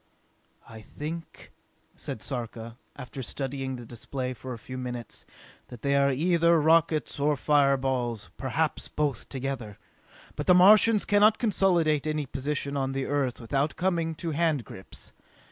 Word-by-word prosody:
"I 110 -1 -11
think," 160 +8 -8 0.4
said 110 - -6
Sarka, 115 -3 -5 0.2
after 135 0 -8
studying 135 +1 -3
the 120 -1 -9
display 125 +3 -5
for 130 +1 -8
a 120 - -5
few 130 +3 -9
minutes, 125 -2 -6 0.4
"that 120 - -12
they 140 0 +2
are 140 0 +4
either 170 +3 +3
rockets 160 -1 +2
or 145 +1 +2
fireballs, 130 -6 +1
perhaps 150 +4 -2
both 145 -6 -2
together! 130 -6 -5 0.6
But - - -4
the 180 - +7
Martians 210 +3 +6
cannot 210 +1 +4
consolidate 170 - +2
any 155 -1 -1
position 140 +2 -3
on 135 -1 -1
the 135 0 -2
Earth 140 -3 -1
without 135 +5 -1
coming 170 -3 0
to 165 +1 -4
handgrips. 145 - -3
140 Hz, 140 wpm, -27 LUFS, 125-160 Hz, 0.6 s, the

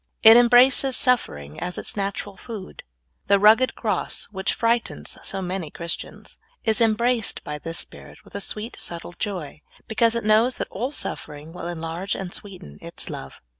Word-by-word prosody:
It 225 +1 +10
embraces 245 +2 +6
suffering 75 - 0
as 180 0 -2
its - - -3
natural 200 0 -3
food. 205 -1 -9 0.5
The 200 - +5
rug 215 +3 +7
ged 255 - 0
cross, 210 -5 -1
which 190 0 -1
frightens 230 0 -1
so 195 -1 -3
many 180 -3 -3
Christians, 170 +2 -6 0.2
is 220 +1 +1
em 225 -2 +5
braced 235 -1 +1
b}^ 150 0 -6
this 165 0 -5
spirit - - -9
with - - -17
a 200 - -3
sweet, 215 +4 -3
subtle 170 0 -4
joy, 175 -8 -4 0.3
because 230 +1 +2
it 235 - -1
knows 220 +4 +4
that - - -4
all 245 +7 -3
suffering 150 - -5
will 170 - -6
enlarge 170 +3 -3
and 185 -2 -6
sweeten 185 - -7
its - - -3
love. 65 - -8
200 Hz, 170 wpm, -24 LUFS, 175-230 Hz, 0.5 s, It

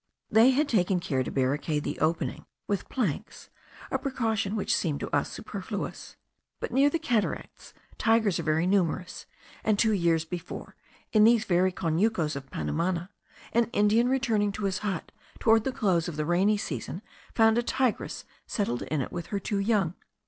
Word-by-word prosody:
They 225 +4 +7
had 280 +3 +2
taken 190 -5 +2
care 135 -6 -1
to 130 - -3
barricade 145 +3 0
the - - -4
opening 160 +2 -1 0.2
with 200 -2 -2
planks, 215 - -3 0.4
a - - 0
precaution 225 -6 -1
which 210 - +1
seemed 150 -5 -1
to - - -2
us - - +1
superfluous; - - -6 0.4
but - - -4
near 275 +2 +4
the 330 - 0
Cataracts 245 -10 -2 0.2
tigers 225 -5 +3
are - - 0
very 155 +1 +1
numerous, 180 -1 0 0.4
and 215 -2 +2
two 220 +1 +3
years 170 -4 +2
before, 175 +1 -7 0.4
in 215 -1 +6
these 225 0 +5
very 185 +1 +3
conucos 170 -1 0
of 135 -1 -7
Panumana, 170 - -2 0.4
an 235 0 +4
Indian 215 +4 +3
returning 230 -6 +1
to 210 - -5
his 190 -1 0
hut, 195 -5 -3 0.3
towards 225 -1 +4
the 265 - 0
close 185 -9 +1
of 170 - -5
the 155 0 -1
rainy 190 +6 +3
season, 155 - -5 0.3
found 225 0 +5
a - - +3
tigress 255 -1 -1 0.2
settled 160 - -1
in 155 -2 -1
it - - -5
with 175 -2 -5
her 200 - -2
two 200 +1 -2
young. 200 -5 +1
200 Hz, 170 wpm, -28 LUFS, 165-225 Hz, 0.4 s, They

